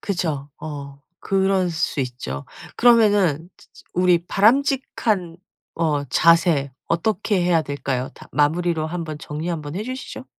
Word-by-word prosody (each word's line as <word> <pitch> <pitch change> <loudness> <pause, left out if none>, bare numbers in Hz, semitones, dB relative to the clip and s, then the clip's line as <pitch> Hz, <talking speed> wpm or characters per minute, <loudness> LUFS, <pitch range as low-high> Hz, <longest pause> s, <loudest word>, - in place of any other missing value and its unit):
그죠. 160 -8 -2
어 140 -2 -7 0.2
그럴 190 -2 +1
수 160 -3 -1
있죠. 120 - -5 0.3
그러면은 205 - +4
즈 - - -21
즈 - - -17
우리 180 -1 +3
바람직한 220 -6 +1 0.4
어 150 -3 0
자세 165 -1 +3 0.2
어떻게 195 +3 0
해야 175 -2 +3
될까요? 135 -3 -3
다 - - -14
마무리로 160 +3 +1
한번 160 -2 -5
정리 150 +3 -5
한번 155 -3 -4
해 205 - -2
주시죠. 255 +1 -7
170 Hz, 265 characters per minute, -22 LUFS, 145-195 Hz, 0.4 s, 그러면은